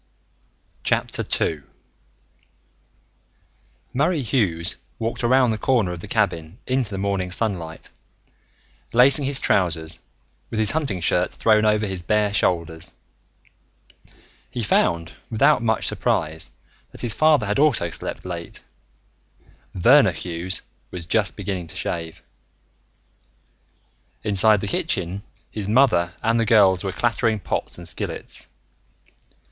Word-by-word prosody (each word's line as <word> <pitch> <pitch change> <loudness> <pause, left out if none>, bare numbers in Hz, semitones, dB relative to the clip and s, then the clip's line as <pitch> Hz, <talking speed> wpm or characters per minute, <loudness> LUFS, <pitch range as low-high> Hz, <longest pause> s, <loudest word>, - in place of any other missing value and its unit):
II 80 -3 0 2.3
Murray 150 +3 +1
Hughes 100 -9 0 0.2
walked 115 +2 -3
around 125 0 +4
the 110 - -3
corner 115 -9 +1
of 90 - -6
the - - -9
cabin 80 +3 -1
into 130 -3 0
the 100 - -5
morning 95 -2 -1
sunlight, 90 -5 -3 1.0
lacing 135 +4 +5
his 140 0 +2
trousers, 80 -3 0 0.5
with 110 - -3
his 110 - +4
hunting 135 - -1
shirt 90 +1 +1
thrown 110 -1 +3
over 105 0 +3
his 95 -3 -1
bare 105 +2 +1
shoulders. 85 -5 0 1.6
He 120 - -4
found, 85 -4 +1 0.2
without 130 +4 +3
much 110 -2 0
surprise, 80 +1 -1 0.4
that - - -7
his 120 -3 0
father 155 -6 +4
had 105 +5 0
also 125 - +3
slept - - -5
late. 85 -2 -6 1.1
Verner 125 +11 +5
Hughes 90 0 -4 0.3
was 90 -2 -7
just 105 +3 +1
beginning 95 -4 -4
to - - -7
shave. 85 -2 -4 2.0
Inside 105 0 +4
the 100 - -3
kitchen, 95 -1 -1 0.3
his 105 -3 -4
mother 105 -7 +3
and 115 +1 +2
the 115 - +2
girls 100 -5 +5
were 95 - -2
clattering 115 0 0
pots - - -3
and 85 -1 -9
skillets. - - -5
100 Hz, 120 wpm, -22 LUFS, 90-115 Hz, 2.3 s, lacing